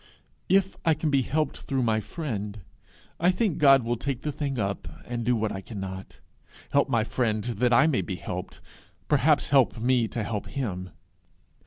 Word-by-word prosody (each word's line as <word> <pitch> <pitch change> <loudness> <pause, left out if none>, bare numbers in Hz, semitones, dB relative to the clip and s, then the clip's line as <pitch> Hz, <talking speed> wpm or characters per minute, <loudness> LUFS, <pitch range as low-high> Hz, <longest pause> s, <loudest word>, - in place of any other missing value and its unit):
If 195 0 +3
I 160 -2 +3
can 155 0 -1
be 135 -1 +4
helped 150 +5 -1
through 135 -2 -1
my 110 -2 +2
friend, 105 - -5 0.6
I 175 - +4
think 190 -2 0
God 135 -3 +6
will 120 +1 -1
take 135 0 -3
the 150 - -1
thing 140 -2 -3
up, 100 -2 -2 0.2
and 120 -1 -3
do 120 +1 +2
what 110 -1 -1
I 95 - -5
cannot 95 -2 -6
do - - -20 0.6
help - - +3
my 115 -2 +2
friend 110 -2 -1
that 120 +1 0
I 130 +5 +6
may 155 -5 +2
be 95 - -4
helped 90 0 -6 0.5
perhaps 150 +1 +3
help 135 -4 +4
me 120 0 +2
to 115 0 -3
help 105 -2 -3
him. 95 -9 -4
120 Hz, 185 wpm, -27 LUFS, 110-140 Hz, 0.6 s, God